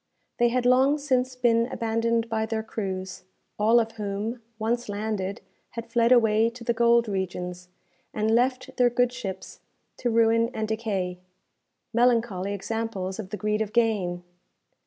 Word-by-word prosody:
They 240 0 +4
had 245 +1 0
long 260 +4 +4
since 255 -3 0
been 235 -2 +2
abandoned 230 -1 0
by 220 -1 -1
their 220 -1 -2
crews, 190 -4 -5 0.4
all 225 +3 +5
of 225 -1 -1
whom, 210 +3 -3 0.2
once 230 +1 -1
landed, 205 -1 -3 0.4
had 230 0 -6
fled 235 +1 +3
away 225 -2 +5
to 235 0 -11
the 235 - +1
gold 235 0 +4
regions, 180 -2 -4 0.4
and 215 +1 0
left 255 +2 0
their 245 -1 +5
good 245 +1 +1
ships 195 -7 -7 0.4
to 245 - -1
ruin 230 0 +3
and 220 0 -2
decay 200 -5 -2 0.7
melancholy 230 -5 +2
examples 200 -2 -4
of 195 -4 -6
the 210 - -4
greed 210 +2 -1
of 215 -1 -3
gain! 200 -7 +1
225 Hz, 150 wpm, -26 LUFS, 205-235 Hz, 0.7 s, all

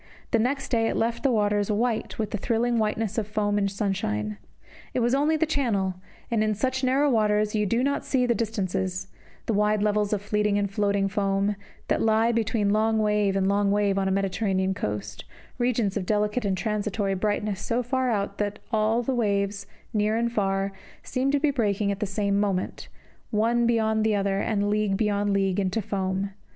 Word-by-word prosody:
The 230 - +3
next 270 +4 -1
day 225 -3 +2
it - - -1
left 230 +1 0
the 275 - +2
waters 205 -2 +1
white 225 +1 -1
with 220 -2 -2
the - - -1
thrilling 235 +2 +1
whiteness 215 0 0
of 210 - -3
foam 205 -1 0
in 200 - +1
sunshine. 105 - -2 0.6
It - - +2
was 240 +1 +2
only 295 +3 +2
the 320 - +2
Channel; 230 -11 0 0.4
and 220 -2 +2
in 215 -1 +1
such 260 +5 -1
narrow 270 +3 +3
waters 215 -4 +2
you 210 -1 +1
do 235 +5 +1
not 280 +1 0
see 255 -2 +1
the 240 - +2
distances, 190 -5 -2 0.4
the 225 - 0
wide 210 0 +2
levels 210 -1 +1
of 205 -1 -1
fleeting 210 0 +1
and 200 -1 -1
floating 200 -2 +1
foam, 195 0 0 0.3
that - - +1
lie 220 0 +3
light - - +1
between 220 -2 +1
long 220 +1 +2
wave 210 -2 +2
and 190 -1 +1
long 200 0 +2
wave 200 -1 +2
on 195 - 0
a - - +1
Mediterranean 190 0 0
coast, 105 - -4 0.4
regions 240 -5 +1
of 190 -4 -3
delicate 210 +2 0
and 190 -2 0
transitory 205 0 -1
brightness 205 0 -1
so 235 +3 -1
far 255 +1 0
out 200 -3 -2
that 205 0 -1
all 220 +2 +2
the 265 - -1
waves, 200 -3 0 0.3
near 215 +1 +1
and 235 0 0
far, 195 -2 0 0.3
seem 260 +2 -1
to 285 +1 +2
be 295 0 +2
breaking 210 -5 0
at 195 - -4
the 210 - -1
same 200 0 0
moment, 195 -3 -2 0.4
one 230 +2 +2
beyond 220 -2 +2
the 220 -1 +2
other, 195 -1 0
and 205 -1 0
league 210 -1 +1
beyond 205 -1 +1
league, 195 -1 +1
into 195 +2 0
foam. 190 -1 -2
210 Hz, 195 wpm, -26 LUFS, 200-225 Hz, 0.6 s, The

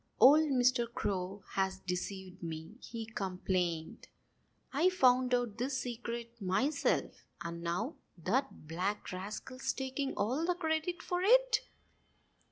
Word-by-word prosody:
"Old 300 +4 +8
Mr. 250 -2 +3
Crow 195 -2 -2
has 190 0 0
deceived 185 0 -4
me!" 160 +1 -5
he 230 -1 -6
complained. 180 -5 -2 0.7
"I 320 +7 +4
found 255 -7 +4
out 240 -3 -2
this 260 +2 0
secret 235 -1 -5
myself. 260 +11 +1 0.2
And 170 0 -5
now 180 - -2 0.2
that 210 - -1
black 185 +6 -2
rascal's 210 +8 -4
taking 270 +1 -2
all 250 +10 0
the 355 +1 +2
credit 320 0 -1
for 355 0 -1
it." - - +5
235 Hz, 120 wpm, -33 LUFS, 185-270 Hz, 0.7 s, Old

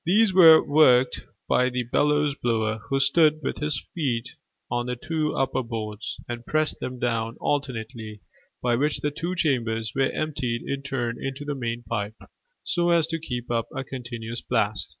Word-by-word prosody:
These 205 +3 +4
were 165 -4 +9
worked 130 -4 +4 0.2
by 125 - +3
a 125 -1 -1
bellows 145 +4 +2
blower, 110 -4 -1
who 135 -1 +1
stood 155 +2 +4
with - - -2
his 150 -4 -1
feet 130 -8 -1 0.4
on 120 0 -1
the 125 - -2
two 155 +4 -2
upper 135 0 0
boards, 110 -3 -5
and 120 0 -5
pressed 155 +4 0
them 125 0 -5
down 115 -1 -1
alternately, 115 -6 -3 0.4
by 120 -1 +2
which 145 +3 0
the 150 - 0
two 170 +5 -3
chambers 115 - 0
were 135 -1 +2
emptied 125 -6 -2
in 140 0 -2
turn 120 -4 -3
into 135 +2 -4
the 145 - -2
main 120 -3 -3
pipe, 105 -2 -3 0.5
so 175 0 +1
as 170 -2 +4
to 165 0 -3
keep 125 -6 -5
up 115 -1 0
a 135 - -2
continuous 120 -3 -6
blast. 105 -5 -1
125 Hz, 170 wpm, -25 LUFS, 115-150 Hz, 0.5 s, were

